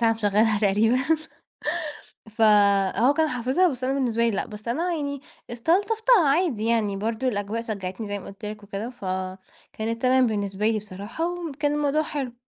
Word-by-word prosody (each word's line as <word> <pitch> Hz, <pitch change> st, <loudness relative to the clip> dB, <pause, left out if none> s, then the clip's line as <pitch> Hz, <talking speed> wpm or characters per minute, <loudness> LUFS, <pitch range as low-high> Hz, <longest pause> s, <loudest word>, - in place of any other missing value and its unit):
ساعة 230 Hz, -1 st, +4 dB
مشغلها 215 Hz, 0 st, +2 dB
تقريبًا. 215 Hz, +4 st, +3 dB, 1.3 s
فهو 210 Hz, +2 st, +4 dB
كان 315 Hz, +1 st, +2 dB
حافظها 260 Hz, +8 st, +2 dB
بس 255 Hz, -1 st, -7 dB
أنا 265 Hz, +1 st, +1 dB
بالنسبة 235 Hz, -4 st, +1 dB
لي 230 Hz, -, +3 dB
لأ، 195 Hz, -, -2 dB
بس 210 Hz, +1 st, -10 dB
أنا 335 Hz, +9 st, 0 dB
يعني 285 Hz, -3 st, -3 dB, 0.3 s
استلطفتها 395 Hz, -, +3 dB
عادي 275 Hz, -, +1 dB
يعني 215 Hz, -4 st, +1 dB
برضه 225 Hz, +5 st, -2 dB
الأجواء 210 Hz, 0 st, -2 dB
شجَّعتني 205 Hz, -1 st, -5 dB
زي 205 Hz, 0 st, -3 dB
ما -, -, -12 dB
قلت 200 Hz, +1 st, -10 dB
لك 210 Hz, 0 st, -6 dB
وكده، 205 Hz, +3 st, -5 dB
فكانت 190 Hz, +2 st, -5 dB
تمام 255 Hz, -1 st, +4 dB
بالنسبة 205 Hz, -1 st, -1 dB
لي 220 Hz, -1 st, +1 dB
بصراحة، 205 Hz, -, -5 dB
وم 350 Hz, -3 st, -5 dB
كان 290 Hz, +1 st, 0 dB
الموضوع 295 Hz, +1 st, +1 dB
حلو. 275 Hz, -6 st, -4 dB
230 Hz, 165 wpm, -25 LUFS, 205-275 Hz, 1.3 s, ساعة